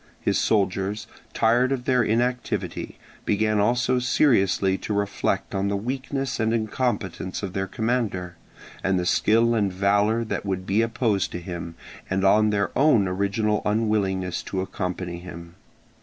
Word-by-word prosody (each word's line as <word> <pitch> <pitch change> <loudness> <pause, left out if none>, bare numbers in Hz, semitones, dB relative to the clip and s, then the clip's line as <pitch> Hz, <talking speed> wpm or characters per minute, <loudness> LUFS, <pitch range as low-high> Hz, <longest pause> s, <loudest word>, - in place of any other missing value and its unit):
His - - +1
soldiers, 100 0 0 0.3
tired 120 +3 +2
of 125 -2 -2
their 125 -2 +3
inactivity, 115 -5 -1 0.3
began 110 0 +1
also 125 +4 +2
seriously 105 -7 +2
to 105 - -3
reflect 100 0 -1
on 95 0 0
the 100 0 0
weakness 135 +4 -3
and 110 0 +1
incompetence 105 -5 -2
of 95 -2 -4
their 95 0 -2
commander, 100 -4 -2 0.5
and 95 0 +2
the 90 - -1
skill 115 +5 +3
and 105 -4 +1
valour 100 +4 +2
that 110 - -3
would 95 -2 -3
be 100 +4 +2
opposed 115 -3 0
to 85 - -3
him, 85 -1 -6 0.3
and 95 +1 0
on 105 +2 +5
their 100 -1 -1
own 130 -8 +4
original 100 +3 0
unwillingness 105 -4 0
to 95 - -3
accompany 90 -2 -4
him. 85 -1 -10
105 Hz, 145 wpm, -24 LUFS, 95-115 Hz, 0.5 s, on